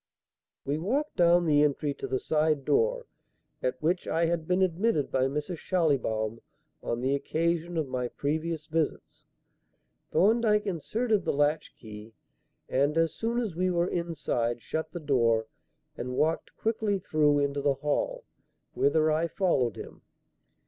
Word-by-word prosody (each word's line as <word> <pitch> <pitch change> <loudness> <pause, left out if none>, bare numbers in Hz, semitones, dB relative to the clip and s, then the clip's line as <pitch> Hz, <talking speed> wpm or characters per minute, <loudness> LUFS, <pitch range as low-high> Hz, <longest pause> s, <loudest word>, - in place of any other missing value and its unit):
We 145 +2 -1
walked 275 - -1
down 175 0 +5
the 145 -2 +4
entry 145 0 +1
to - - -6
the 130 - 0
side 150 -1 0
door 485 +2 +1 0.6
at 130 0 -1
which 175 +3 0
I 165 +1 +1
had 165 -1 -1
been 185 +1 +2
admitted 185 -3 +1
by 130 0 +2
Mrs. 150 +5 -4
Schallibaum 115 - 0 0.4
on 115 - -3
the 130 +2 +1
occasion 170 +4 -1
of 155 -3 0
my 125 -1 -2
previous 155 +4 -3
visits. 160 0 -3 0.8
Thorndyke 215 +1 +3
inserted 210 - 0
the - - 0
latch 145 +2 0
key, 110 0 -11 0.5
and, 145 +4 +1
as 165 0 +2
soon 230 +1 -1
as 215 -8 -3
we 185 +2 +1
were 175 0 +1
inside, 150 -9 -2
shut 160 +7 -4
the 175 - -5
door 115 -7 +2 0.5
and 125 +1 -5
walked 160 +2 0
quickly 220 -2 0
through 150 -5 +2
into 140 0 0
the 140 -1 +2
hall, - - -2 0.5
whither 155 +2 +2
I 160 +2 +1
followed 165 - +1
him. - - -10
160 Hz, 150 wpm, -28 LUFS, 140-180 Hz, 0.8 s, down